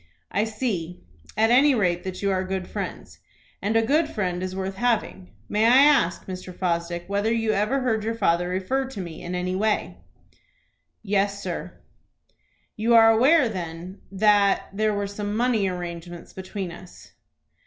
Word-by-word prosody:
"I 205 Hz, -, +1 dB
see 215 Hz, -7 st, -4 dB, 0.3 s
at 220 Hz, +1 st, +3 dB
any 270 Hz, +3 st, +5 dB
rate 180 Hz, -5 st, 0 dB
that 185 Hz, +1 st, -5 dB
you 200 Hz, -, +2 dB
are 185 Hz, -1 st, 0 dB
good 190 Hz, 0 st, -4 dB
friends, -, -, -6 dB, 0.4 s
and 210 Hz, +3 st, -1 dB
a 225 Hz, -, +4 dB
good 300 Hz, +5 st, +2 dB
friend 180 Hz, -, -2 dB
is 185 Hz, 0 st, -4 dB
worth 190 Hz, 0 st, -4 dB
having. 220 Hz, -6 st, -1 dB, 0.2 s
May 210 Hz, +1 st, +1 dB
I 240 Hz, +3 st, +6 dB
ask, 285 Hz, -, +3 dB
Mr. 185 Hz, -1 st, -7 dB
Fosdick, 175 Hz, -1 st, -2 dB
whether 200 Hz, +3 st, 0 dB
you 225 Hz, -1 st, +1 dB
ever 215 Hz, +7 st, 0 dB
heard 225 Hz, -4 st, 0 dB
your 225 Hz, +1 st, -2 dB
father 175 Hz, -5 st, +1 dB
refer 190 Hz, +9 st, -1 dB
to 260 Hz, -6 st, -8 dB
me 170 Hz, -4 st, -7 dB
in 175 Hz, +1 st, -5 dB
any 180 Hz, +1 st, -2 dB
way?" 215 Hz, +2 st, -1 dB, 1.0 s
"Yes, 200 Hz, -1 st, 0 dB
sir." -, -, -5 dB, 1.0 s
"You 230 Hz, +2 st, +2 dB
are 225 Hz, -1 st, +8 dB
aware, 260 Hz, +5 st, +5 dB
then, 180 Hz, -2 st, -6 dB
that 200 Hz, 0 st, +3 dB
there 215 Hz, +1 st, +1 dB
were 205 Hz, 0 st, -1 dB
some 205 Hz, +1 st, -4 dB
money 235 Hz, -4 st, +2 dB
arrangements 175 Hz, -1 st, -6 dB
between 190 Hz, -1 st, -6 dB
us?" 180 Hz, +1 st, -13 dB
200 Hz, 165 wpm, -24 LUFS, 180-225 Hz, 1.0 s, are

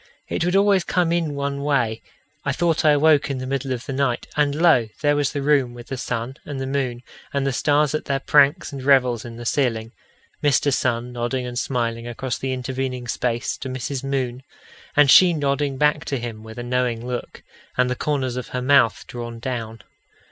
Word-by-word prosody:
It -, -, -1 dB
would 180 Hz, +2 st, +1 dB
always 195 Hz, -2 st, +4 dB
come 175 Hz, -2 st, +1 dB
in 165 Hz, -4 st, 0 dB
one 140 Hz, 0 st, -2 dB
way: 125 Hz, -6 st, 0 dB, 0.4 s
I -, -, 0 dB
thought 170 Hz, -2 st, +1 dB
I 155 Hz, -, +5 dB
awoke 150 Hz, 0 st, +4 dB
in 135 Hz, -, -2 dB
the 130 Hz, -, -4 dB
middle 135 Hz, 0 st, -2 dB
of 125 Hz, -1 st, -3 dB
the 135 Hz, -, -4 dB
night, 130 Hz, -3 st, 0 dB
and 145 Hz, -1 st, +2 dB
lo! 155 Hz, -8 st, +4 dB
there 145 Hz, -1 st, +3 dB
was 145 Hz, -2 st, +1 dB
the 145 Hz, -2 st, -3 dB
room 135 Hz, -4 st, +2 dB
with 120 Hz, 0 st, -11 dB
the 135 Hz, -, -3 dB
sun 125 Hz, +2 st, -4 dB
and 145 Hz, -2 st, -6 dB
the 135 Hz, -, -3 dB
moon 130 Hz, -3 st, -2 dB, 0.3 s
and 140 Hz, -1 st, -1 dB
the 135 Hz, -, 0 dB
stars 145 Hz, +4 st, +2 dB
at 155 Hz, -, -2 dB
their 140 Hz, -1 st, 0 dB
pranks 145 Hz, +5 st, +3 dB
and 135 Hz, -, -5 dB
revels 130 Hz, -4 st, +3 dB
in 115 Hz, -1 st, -8 dB
the 120 Hz, +1 st, -8 dB
ceiling 115 Hz, -4 st, 0 dB, 0.5 s
Mr. 145 Hz, -1 st, +3 dB
Sun 125 Hz, -1 st, 0 dB
nodding 125 Hz, +1 st, -2 dB
and 120 Hz, 0 st, -3 dB
smiling 115 Hz, -2 st, -2 dB
across 120 Hz, +1 st, -4 dB
the 135 Hz, -, -2 dB
intervening 130 Hz, -1 st, -3 dB
space 120 Hz, 0 st, -1 dB
to 130 Hz, -, -5 dB
Mrs. 130 Hz, +1 st, -4 dB
Moon, 130 Hz, -2 st, -2 dB, 0.5 s
and 145 Hz, -2 st, +6 dB
she 180 Hz, -2 st, +8 dB
nodding 140 Hz, -2 st, -1 dB
back 150 Hz, +2 st, +2 dB
to 140 Hz, -, -2 dB
him 115 Hz, -3 st, -6 dB
with 110 Hz, +1 st, -11 dB
a 120 Hz, -, -4 dB
knowing 120 Hz, -1 st, -1 dB
look, 125 Hz, -1 st, -5 dB, 0.3 s
and 125 Hz, 0 st, +3 dB
the 125 Hz, -, -1 dB
corners 130 Hz, -3 st, -1 dB
of 125 Hz, -, -4 dB
her 125 Hz, -, -4 dB
mouth 130 Hz, -4 st, +4 dB
drawn 120 Hz, -1 st, -7 dB
down. 115 Hz, -2 st, -5 dB
130 Hz, 205 wpm, -22 LUFS, 120-145 Hz, 0.5 s, she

